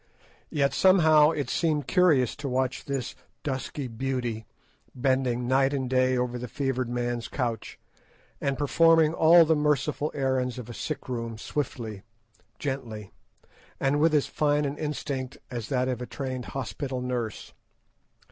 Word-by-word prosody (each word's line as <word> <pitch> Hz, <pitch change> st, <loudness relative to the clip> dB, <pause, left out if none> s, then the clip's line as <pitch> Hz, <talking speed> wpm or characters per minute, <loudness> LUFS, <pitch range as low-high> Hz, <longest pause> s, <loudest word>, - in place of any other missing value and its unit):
Yet 140 Hz, -2 st, +1 dB
somehow 160 Hz, -5 st, +6 dB
it 145 Hz, -5 st, -2 dB
seemed 155 Hz, 0 st, 0 dB
curious 155 Hz, -, +3 dB
to 140 Hz, -2 st, -4 dB
watch 130 Hz, 0 st, -1 dB
this 135 Hz, -3 st, -3 dB, 0.3 s
dusky 135 Hz, -1 st, -3 dB
beauty 120 Hz, -2 st, -3 dB, 0.5 s
bending 125 Hz, -1 st, 0 dB
night 135 Hz, +2 st, +3 dB
and 130 Hz, -2 st, -2 dB
day 130 Hz, 0 st, +2 dB
over 125 Hz, 0 st, -1 dB
the 125 Hz, -, -5 dB
fevered 130 Hz, -1 st, -2 dB
man's 120 Hz, -1 st, -2 dB
couch, 120 Hz, -4 st, -3 dB, 0.6 s
and 140 Hz, -1 st, 0 dB
performing 165 Hz, +2 st, +4 dB
all 165 Hz, +1 st, +7 dB
the 160 Hz, 0 st, +3 dB
merciful 150 Hz, 0 st, +1 dB
errands 130 Hz, -2 st, 0 dB
of 120 Hz, -1 st, -7 dB
a -, -, -8 dB
sick 155 Hz, +5 st, -5 dB
room 115 Hz, -3 st, -4 dB
swiftly, 115 Hz, -5 st, -4 dB, 0.6 s
gently, 115 Hz, -8 st, -5 dB, 0.7 s
and 140 Hz, +2 st, +1 dB
with 155 Hz, 0 st, +4 dB
as 145 Hz, -, +3 dB
fine 150 Hz, -1 st, +1 dB
an 140 Hz, 0 st, -2 dB
instinct 140 Hz, -3 st, -4 dB
as 120 Hz, -3 st, -5 dB
that 130 Hz, -2 st, +1 dB
of 125 Hz, -2 st, -2 dB
a 125 Hz, -, -5 dB
trained 130 Hz, -2 st, -5 dB
hospital 135 Hz, 0 st, -4 dB
nurse. 125 Hz, -4 st, -4 dB
130 Hz, 145 wpm, -27 LUFS, 125-145 Hz, 0.7 s, all